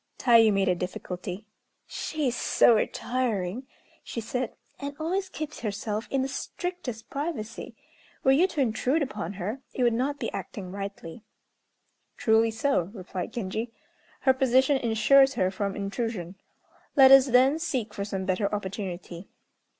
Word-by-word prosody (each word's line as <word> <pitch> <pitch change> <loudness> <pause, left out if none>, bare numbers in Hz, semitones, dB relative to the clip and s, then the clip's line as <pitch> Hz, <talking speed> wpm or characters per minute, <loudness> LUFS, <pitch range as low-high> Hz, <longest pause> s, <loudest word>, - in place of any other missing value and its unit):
Tayû 230 -3 +6
made 195 -1 +1
a 180 - +4
difficulty. 180 +2 -5 0.4
"She 310 -1 -3
is 245 - 0
so 240 - +4
retiring," 235 -1 -1 0.4
she - - -5
said, 250 +2 -3 0.2
"and 280 0 -5
always 375 +5 -1
keeps 310 -1 -6
herself 210 0 -3
in 270 -1 +1
the - - -1
strictest 270 - -5
privacy. 280 -7 -5 0.5
Were 265 - +5
you 320 +8 +5
to 310 -6 -2
intrude 260 +5 +1
upon 210 -8 -5
her, 205 +7 -4
it 255 - 0
would 240 -1 +4
not 270 +5 -1
be - - -3
acting 190 -6 -6
rightly." 195 -2 -7 1.0
"Truly 225 0 +3
so," 220 -5 0
replied 185 -2 -5
Genji; 225 +1 -4 0.5
"her 265 - +5
position 260 +2 +3
insures 265 +4 +4
her 185 0 +1
from 200 0 -3
intrusion. 200 -3 -3 0.6
Let 270 -1 +8
us, 270 0 +9
then, 260 +5 +4
seek 250 -10 -2
for 200 - -3
some 195 -2 -4
better 200 +1 0
opportunity." 190 -3 -5
230 Hz, 145 wpm, -27 LUFS, 200-270 Hz, 1.0 s, us